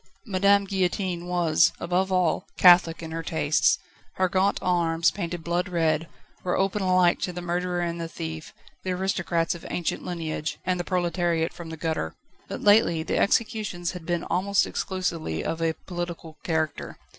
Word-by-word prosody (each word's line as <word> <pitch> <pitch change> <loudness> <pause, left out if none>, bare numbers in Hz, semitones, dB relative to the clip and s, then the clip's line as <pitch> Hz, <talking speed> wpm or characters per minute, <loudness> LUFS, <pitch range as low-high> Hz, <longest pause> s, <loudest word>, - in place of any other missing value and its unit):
Madame 200 -1 +3
Guillotine 185 -2 -1
was, 175 -3 +3
above 185 +2 0
all, 180 -3 +1
catholic 175 -2 +6
in 160 - -6
her 165 0 -3
tastes, 160 -2 +2 0.4
her 185 - +1
gaunt 190 +2 +2
arms, 170 -2 +2
painted 175 -4 -4
blood 175 +2 -1
red, 165 -2 +1 0.4
were 180 - 0
open 195 +2 0
alike 185 -2 +3
to 180 - -2
the 175 - -6
murderer 175 0 -1
and 170 0 -2
the 165 - -3
thief, 160 -1 -6 0.3
the 185 - -3
aristocrats 180 -3 0
of 170 - -10
ancient 175 - -2
lineage, 160 -3 -3
and 180 -1 0
the - - -1
proletariat 175 -2 0
from 170 -2 -9
the 160 - -7
gutter. 160 - -2 0.3
But - - -6
lately 205 -6 +5
the - - -1
executions 205 -5 0
had 180 -3 -9
been 175 -1 0
almost 200 +2 +1
exclusively 170 - -3
of 165 - -2
a 165 -1 +1
political 170 -3 -6
character. 160 -3 -2
175 Hz, 165 wpm, -26 LUFS, 165-185 Hz, 0.4 s, catholic